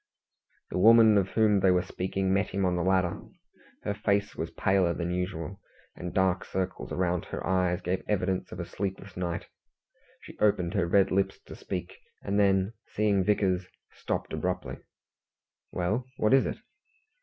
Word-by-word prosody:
The -, -, -1 dB
woman 110 Hz, +1 st, +7 dB
of 95 Hz, -2 st, +2 dB
whom 105 Hz, -2 st, +3 dB
they 95 Hz, 0 st, +4 dB
were 90 Hz, -1 st, +3 dB
speaking 95 Hz, +1 st, -2 dB
met 100 Hz, 0 st, +2 dB
him 100 Hz, 0 st, -1 dB
on 90 Hz, -1 st, +1 dB
the 90 Hz, -, 0 dB
ladder. 90 Hz, -1 st, +1 dB, 0.6 s
Her 105 Hz, -, -1 dB
face 100 Hz, 0 st, 0 dB
was -, -, -3 dB
paler 95 Hz, -3 st, +1 dB
than 85 Hz, 0 st, -2 dB
usual, 90 Hz, +1 st, -4 dB, 0.3 s
and 90 Hz, 0 st, -6 dB
dark 95 Hz, -1 st, +1 dB
circles 95 Hz, -1 st, -4 dB
round 90 Hz, -2 st, 0 dB
her -, -, -5 dB
eyes 90 Hz, 0 st, +1 dB
gave 90 Hz, +2 st, -1 dB
evidence 95 Hz, -2 st, -1 dB
of -, -, -7 dB
a -, -, -3 dB
sleepless 95 Hz, 0 st, -5 dB
night. 85 Hz, -2 st, -3 dB, 0.8 s
She -, -, -13 dB
opened 90 Hz, -4 st, +2 dB
her 95 Hz, -4 st, +1 dB
red 95 Hz, +2 st, +3 dB
lips 95 Hz, 0 st, 0 dB
to -, -, -10 dB
speak, -, -, -6 dB, 0.2 s
and 100 Hz, +1 st, 0 dB
then, 95 Hz, +1 st, +3 dB
seeing 100 Hz, -2 st, +1 dB
Vickers, 95 Hz, -2 st, +1 dB, 0.3 s
stopped -, -, -4 dB
abruptly. -, -, -3 dB, 0.9 s
"Well, 105 Hz, +8 st, -1 dB
what 110 Hz, +3 st, +2 dB
is 135 Hz, -, +5 dB
it?" -, -, -4 dB
95 Hz, 165 wpm, -28 LUFS, 90-100 Hz, 0.9 s, woman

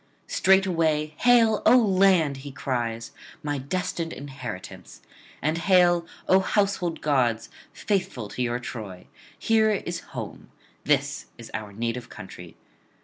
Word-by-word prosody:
Straightway 165 Hz, -6 st, +2 dB
'Hail, 230 Hz, -3 st, +4 dB
O 250 Hz, -, +7 dB
land!' 190 Hz, -, +3 dB
he 140 Hz, +1 st, -8 dB
cries, 120 Hz, -4 st, -3 dB, 0.3 s
'my 145 Hz, -1 st, -2 dB
destined 170 Hz, +3 st, -3 dB
inheritance! 130 Hz, -, -8 dB, 0.4 s
and 155 Hz, +3 st, 0 dB
hail, 175 Hz, -2 st, +4 dB, 0.2 s
O 190 Hz, -, +6 dB
household 190 Hz, -3 st, 0 dB
gods, 125 Hz, -6 st, +1 dB, 0.2 s
faithful 180 Hz, -, -2 dB
to 125 Hz, -, -5 dB
your 120 Hz, -1 st, 0 dB
Troy! 110 Hz, -7 st, -8 dB, 0.3 s
here 220 Hz, -1 st, +3 dB
is 185 Hz, -4 st, -2 dB, 0.2 s
home; -, -, -7 dB, 0.4 s
this -, -, 0 dB
is -, -, -11 dB
our 110 Hz, -1 st, -5 dB
native 115 Hz, +3 st, -4 dB
country. 90 Hz, -3 st, -11 dB
155 Hz, 120 wpm, -25 LUFS, 120-190 Hz, 0.4 s, O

